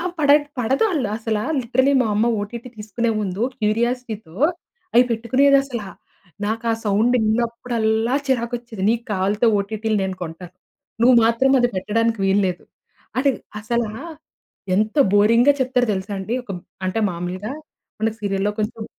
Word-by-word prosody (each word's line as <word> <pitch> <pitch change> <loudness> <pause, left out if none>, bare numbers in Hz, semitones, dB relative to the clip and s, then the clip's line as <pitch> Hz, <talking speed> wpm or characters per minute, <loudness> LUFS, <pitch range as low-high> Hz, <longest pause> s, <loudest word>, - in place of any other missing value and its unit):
అ - - -4 0.2
పడ 290 -2 +3 0.3
పడదు 260 - +1
ఆళ్లు 275 - -1
అసల. 220 -1 -2 0.2
లిటరలీ 260 +3 +2
మా - - -1
అమ్మ 215 +3 +2
ఓటీటీ 235 +4 -6
తీసుకునే 215 +2 -2
ముందు, 195 +1 -3 0.2
క్యూరియాసిటీతో 220 -4 -1 0.6
అవి 245 +1 +7
పెట్టుకునేది 260 +5 +3
అసల. 245 -5 -5 0.6
నాకు 225 +2 -2
ఆ - - +2
సౌండ్ 215 +4 +2
విన్నప్పుడల్లా, 230 0 0
చిరాకొచ్చేది. 235 -4 -2
నీకు 235 0 -1
కావాల్తే 205 +4 +1
ఓటీటీలు 215 +1 -2
నేను 190 -1 -3
కొంటాను. 175 +2 -8 0.5
నువ్వు 255 +1 +6
మాత్రం 235 +4 +3
అది 245 - +3
పెట్టడానికి 225 +3 0
వీల్లేదు. 190 -2 +1 0.5
అంటే 275 +1 +3 0.3
అసలా, 230 0 -1 0.9
ఎంత 215 +2 +1 0.2
బోరింగ్‌గా 230 +7 +5
చెప్తారు 250 -1 +1
తెలుసా? 190 +2 -5
అండి 220 +5 -3
ఒక - - -12 0.4
అంటే 185 +4 -1
మామూలుగా 185 +7 -5 0.5
మనకు 220 0 0
సీరియల్‌లో 195 0 0
కొంచెం 220 +1 -3
225 Hz, 135 wpm, -21 LUFS, 205-240 Hz, 0.9 s, అవి